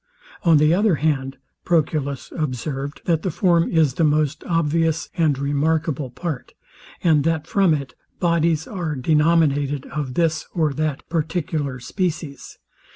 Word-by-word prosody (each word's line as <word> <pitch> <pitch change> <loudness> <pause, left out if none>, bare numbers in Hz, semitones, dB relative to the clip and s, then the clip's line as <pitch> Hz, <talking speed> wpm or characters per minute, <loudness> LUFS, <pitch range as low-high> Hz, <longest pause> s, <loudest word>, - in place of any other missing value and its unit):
On 165 -3 +5
the 150 +2 +4
other 200 -1 +3
hand, 135 -3 -1 0.3
Proculus 150 -5 -1
observed, 140 -1 -4
that 165 -3 +1
the 185 - -1
form 170 0 +2
is 160 -6 +3
the 165 - 0
most 150 -1 +1
obvious 165 -1 0
and 155 -5 +2
remarkable 145 0 0
part, 130 +2 -6 0.5
and 155 -4 +4
that 160 -1 0
from 195 0 +2
it 140 -4 -6 0.3
bodies 165 -2 +1
are 175 -7 -3
denominated 145 -1 +2
of 140 -4 -5
this 160 -2 0
or 155 -4 +1
that 150 0 -3
particular 155 -4 -2
species. 160 - -4
155 Hz, 135 wpm, -22 LUFS, 140-165 Hz, 0.5 s, On